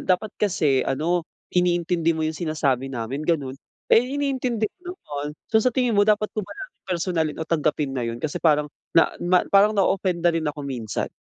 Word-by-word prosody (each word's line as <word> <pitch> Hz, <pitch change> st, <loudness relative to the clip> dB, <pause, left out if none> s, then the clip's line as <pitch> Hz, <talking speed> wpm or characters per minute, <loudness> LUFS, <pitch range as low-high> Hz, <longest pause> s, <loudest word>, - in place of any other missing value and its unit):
dapat 190 Hz, +3 st, +1 dB
kasi 155 Hz, -10 st, +2 dB
ano, 160 Hz, +5 st, 0 dB, 0.2 s
iniintindi 175 Hz, -2 st, +1 dB
mo 160 Hz, -, -1 dB
iyung 155 Hz, -, -1 dB
sinasabi 140 Hz, -5 st, 0 dB
namin." 130 Hz, +2 st, -4 dB
ganoon. 145 Hz, -6 st, +1 dB, 0.4 s
Eh, -, -, +8 dB, 0.2 s
iniintindi 260 Hz, -5 st, -1 dB, 0.2 s
ko 360 Hz, 0 st, -8 dB
naman. 150 Hz, -, -6 dB, 0.2 s
So, 220 Hz, -, +5 dB
sa 255 Hz, -, +3 dB
tingin 250 Hz, -1 st, +1 dB
mo 205 Hz, 0 st, +3 dB
dapat 210 Hz, 0 st, +2 dB
ko 215 Hz, -, -2 dB
ba 195 Hz, -, -10 dB
na 390 Hz, -, -5 dB, 0.2 s
personalin, 170 Hz, -3 st, -1 dB
o 160 Hz, -, -3 dB
tanggapin 150 Hz, -3 st, 0 dB
na 130 Hz, -, -2 dB
iyun? 115 Hz, -1 st, -3 dB
Kasi, 155 Hz, +7 st, -4 dB
parang 150 Hz, -2 st, +3 dB, 0.3 s
na 165 Hz, -, +5 dB
ma 180 Hz, +1 st, +3 dB
parang 205 Hz, +2 st, +5 dB
na-offend 185 Hz, -3 st, +1 dB
rin 165 Hz, -2 st, -1 dB
ako 150 Hz, -1 st, -5 dB
minsan. 120 Hz, -7 st, -3 dB
165 Hz, 185 wpm, -24 LUFS, 150-200 Hz, 0.4 s, Eh